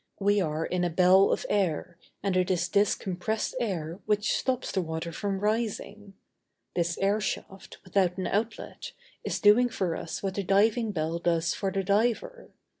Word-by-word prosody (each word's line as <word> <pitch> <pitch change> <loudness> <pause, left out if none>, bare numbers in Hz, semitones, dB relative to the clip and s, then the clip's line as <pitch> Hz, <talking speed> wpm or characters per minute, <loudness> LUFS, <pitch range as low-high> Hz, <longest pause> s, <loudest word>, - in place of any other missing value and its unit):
We 205 0 +3
are 160 -1 -1
in 180 -1 -1
a 175 - +1
bell 185 +3 +5
of - - -1
air, 180 -3 0 0.3
and 195 -2 0
it 185 0 +2
is 175 -1 +1
this 200 0 +3
compressed 195 +6 -3
air 175 -7 -3
which 210 0 +1
stops 260 -1 -1
the 190 - 0
water 160 0 -4
from 195 +3 -3
rising. 210 -1 -2 0.6
This 170 -1 0
airshaft, 195 -1 -2
without 185 -1 +1
an 185 - -2
outlet, 215 +5 -3 0.3
is - - -2
doing 235 +4 +5
for 180 -7 -2
us 165 - -6
what 195 -1 -1
the 200 - -2
diving 215 +4 +2
bell 165 -2 -2
does 170 -1 +1
for 195 -1 -2
the 195 +1 -1
diver. 235 - 0
195 Hz, 170 wpm, -28 LUFS, 175-210 Hz, 0.6 s, bell